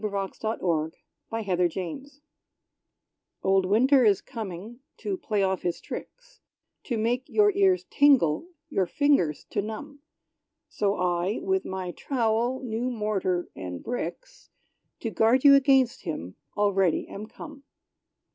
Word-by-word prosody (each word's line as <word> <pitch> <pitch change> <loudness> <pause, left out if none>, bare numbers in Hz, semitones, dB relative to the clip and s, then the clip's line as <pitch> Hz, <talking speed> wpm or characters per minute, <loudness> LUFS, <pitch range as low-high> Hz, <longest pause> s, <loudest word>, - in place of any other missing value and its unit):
=The - - +1 0.3
Stove 220 0 -3
and 160 -3 +1 0.4
the 225 -1 -3
Grate 180 -3 +1
Setter= 270 - -7 1.2
Old 190 -1 +3
Winter 255 +7 +5
is 205 -4 +4
coming, 215 +1 -7 0.2
to 400 - -3
play 210 - -1
off 190 -1 0
his 175 -1 -2
tricks - - -9 0.4
To 240 - -2
make 240 +4 0
your 415 -1 +4
ears 380 -2 +3
tingle 275 - +4 0.2
your 195 - 0
fingers 280 - +2
to 205 - 0
numb! 280 +8 -7 0.7
So 200 -1 0
I, 180 +3 0
with 380 0 0
my 185 -1 -4
trowel, 240 +2 0
new 240 +1 -2
mortar 210 -6 -1
and 90 -1 -6
bricks, - - -6 0.5
To 225 - -3
guard 230 +5 +3
you 285 -1 +9
against 265 -2 +4
him, 120 - -5 0.2
already 195 -4 +2
am 210 +2 -8
come. 290 +4 -11
220 Hz, 135 wpm, -27 LUFS, 185-275 Hz, 1.2 s, you